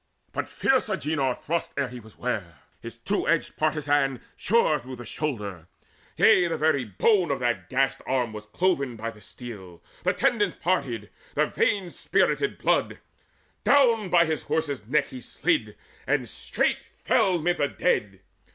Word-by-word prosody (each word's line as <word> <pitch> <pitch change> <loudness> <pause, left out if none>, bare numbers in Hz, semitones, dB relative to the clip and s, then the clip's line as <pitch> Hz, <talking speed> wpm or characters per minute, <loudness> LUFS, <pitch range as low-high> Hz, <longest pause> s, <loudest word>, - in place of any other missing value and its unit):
But - - -3
fierce 260 -4 +1
Agenor 150 -9 0
thrust 170 +2 -3
Ere 140 -1 +1
he 125 0 -8
was 110 -1 -16
ware; 105 -10 -3 0.3
his - - -9
two - - -1
edged - - +1
partizan 145 -4 +1 0.2
Shore 195 -8 +2
though 130 +1 -8
his 120 -2 -10
shoulder; 105 - -4 0.5
yea, 175 - +6
the 165 -1 -2
very 155 -4 +2
bone 175 - +2
Of 140 - +1
that 120 -1 -1
gashed 135 0 +1
arm 125 -4 0
was 105 -1 -8
cloven 140 - 0
by 115 +1 -4
the 105 -2 -17
steel; 95 -3 -10 0.2
The 185 +2 +1
tendons 230 -8 +1
parted, 135 - -1 0.2
the - - +3
veins 190 -4 -1
spirted 415 - +1
blood: - - +1 0.7
Down 230 -8 +4
by 170 -1 +5
his 160 -1 -1
horse's 145 -8 -2
neck 140 +2 +1
he 130 - -8
slid, - - -1 0.3
and - - +1
straight - - -1 0.2
Fell 180 -2 +3
mid 175 +2 +1
the 145 - +2
dead. 105 - -1
140 Hz, 160 wpm, -26 LUFS, 120-175 Hz, 0.7 s, yea